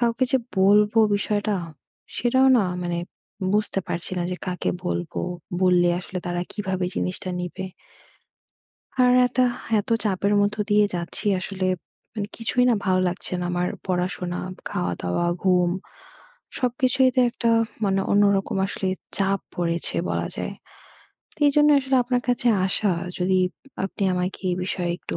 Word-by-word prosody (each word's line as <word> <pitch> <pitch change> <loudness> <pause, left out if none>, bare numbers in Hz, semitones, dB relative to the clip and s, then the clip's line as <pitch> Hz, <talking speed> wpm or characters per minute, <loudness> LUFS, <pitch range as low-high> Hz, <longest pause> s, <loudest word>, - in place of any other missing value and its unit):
কাউকে 235 +1 +2
যে - - +6 0.2
বলব 205 +2 +5 0.2
বিষয়টা 205 +1 0 0.6
সেটাও 260 +2 +3
না 200 - +2 0.2
মানে 175 -1 -1 0.5
বুঝতে 210 -2 +1
পারছি 170 +2 -3
না - - 0
যে - - -3
কাকে 180 -1 -1
বলবো? 175 -2 -2 0.4
বললে 180 -1 +4
আসলে 185 0 -6
তারা 175 0 -1
কীভাবে 190 -3 -2
জিনিসটা 185 0 -2
নিবে? 180 +2 -5 1.4
আর 250 - +5 0.2
একটা 255 +1 +1 0.4
এত 205 - -5
চাপের 200 0 +1
মতো 205 +1 0
দিয়ে 210 0 +5
যাচ্ছি 170 +3 -4
আসলে 185 0 -3 0.5
মানে 205 -2 -3
কিছুই 245 +2 +1
না 240 - +4
ভালো 185 -1 +3
লাগছে 180 +1 -4
না 175 - -2
আমার 175 0 0 0.2
পড়াশোনা, 180 -1 -2 0.3
খাওয়া 90 0 -1
দাওয়া, 90 - 0 0.2
ঘুম 180 -2 +4 0.9
সবকিছুই 255 +1 +2
তে 255 - +5
একটা 235 - 0 0.4
মানে 195 -1 +2
অন্যরকম 200 -1 +3
আসলে 195 -1 -3 0.3
চাপ 195 0 +1 0.2
পড়েছে 170 -1 -1
বলা - - -1
যায়। - - -3 0.8
তো - - -24
এজন্য 295 +1 +4
আসলে 265 0 +1
আপনার 245 0 0
কাছে 245 0 +1 0.2
আসা 195 +1 +1 0.3
যদি 185 +1 +2 0.5
আপনি 195 - -5
আমাকে 180 +1 -2
এ - - +1
বিষয়ে 180 -2 -2
একটু - - -5
195 Hz, 145 wpm, -24 LUFS, 180-215 Hz, 1.4 s, যে